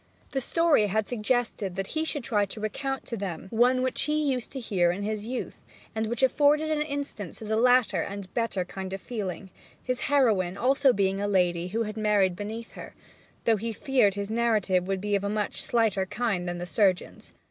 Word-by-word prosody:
The 270 - -1
story 320 -6 +3
had 215 +2 0
suggested 225 -4 -1
that 195 0 -2
he 315 0 0
should 290 -4 -2
try 210 -5 +1
to 200 +2 -7
recount 270 +6 -3
to 235 - -3
them 190 -6 -5
one 250 +3 +3
which 260 - 0
he 305 +1 +1
had 275 - +2
used 250 -2 -5
to 270 - -4
hear 190 -7 +1
in 185 +4 -2
his 215 0 -3
youth, 255 +1 -5 0.3
and 220 0 -1
which 235 +3 -2
afforded 295 +4 +3
an 305 -1 +1
instance 285 - -4
of 220 - -7
the 220 - 0
latter 235 -6 +4
and 200 0 -6
better 230 -6 -1
kind 190 +1 -6
of 195 - -4
feeling, 190 -4 -5 0.3
his 255 -1 -2
heroine 215 -11 +3
being - - -10
also 270 +4 +4
a 195 -1 0
lady 180 -3 +1
who 225 +5 -1
had 215 0 -6
married 205 -4 +2
beneath 220 +4 -6
her, - - -10 0.5
though 225 -1 +4
he 225 +3 -3
feared 240 -4 +2
his 200 +1 -4
narrative 210 -6 +1
would 195 -1 -1
be 205 0 0
of 200 - 0
a 200 - -1
much 210 0 -1
slighter 215 -5 +1
kind 195 -6 -1
than 175 - -3
the 175 - -4
surgeon's. 190 0 0
215 Hz, 210 wpm, -27 LUFS, 195-250 Hz, 0.5 s, latter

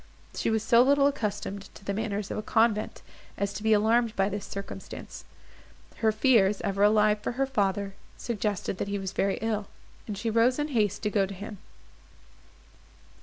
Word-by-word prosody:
She - - 0
was 220 -1 +1
so 235 +1 +5
little 280 +2 +4
accustomed 205 -6 -2
to 195 - -14
the 200 - -1
manners 210 -1 -3
of - - -3
a - - -2
convent, 220 -1 +1 0.3
as 200 0 -1
to - - -6
be 220 +1 +1
alarmed 225 +2 +3
by 195 +1 +2
this 205 0 -5
circumstance; 195 0 -8 0.7
her 220 -1 +2
fears, 210 -4 +3
ever 195 0 -2
alive 210 0 +4
for 210 - -3
her 270 +2 +1
father, 200 -6 -1 0.2
suggested 210 -5 -2
that - - -2
he 200 0 -2
was 190 -1 -4
very 195 0 0
ill, 215 -2 -1 0.4
and 210 -2 -4
she 225 +2 -2
rose 230 +3 +3
in 295 0 -1
haste 210 -6 0
to 210 - 0
go 200 -2 +2
to 195 - -8
him. 205 +1 -8
210 Hz, 180 wpm, -28 LUFS, 200-225 Hz, 0.7 s, so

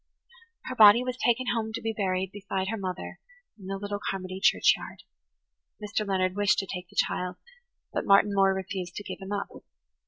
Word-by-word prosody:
Her 255 - -4
body 215 +1 +8
was 250 0 -3
taken 245 +1 +1
home 220 -2 -2
to - - -3
be 225 0 -2
buried 190 -2 -1
beside 195 -1 -3
her 225 - -1
mother 185 -3 -5 0.4
in 190 - -10
the 195 0 -3
little 205 +1 -4
Carmody 185 -1 -5
churchyard. 90 - +2 0.8
Mr. 210 0 -3
Leonard 185 -1 0
wished 205 0 +3
to 195 - 0
take 180 -2 -7
the - - -20
child, 180 0 0 0.6
but - - -1
Martin 200 +1 +5
Moore 195 -1 +4
refused 190 -2 -5
to 205 - -5
give - - -7
him 190 +1 -7
up. 205 -1 -2
195 Hz, 185 wpm, -27 LUFS, 190-210 Hz, 0.8 s, body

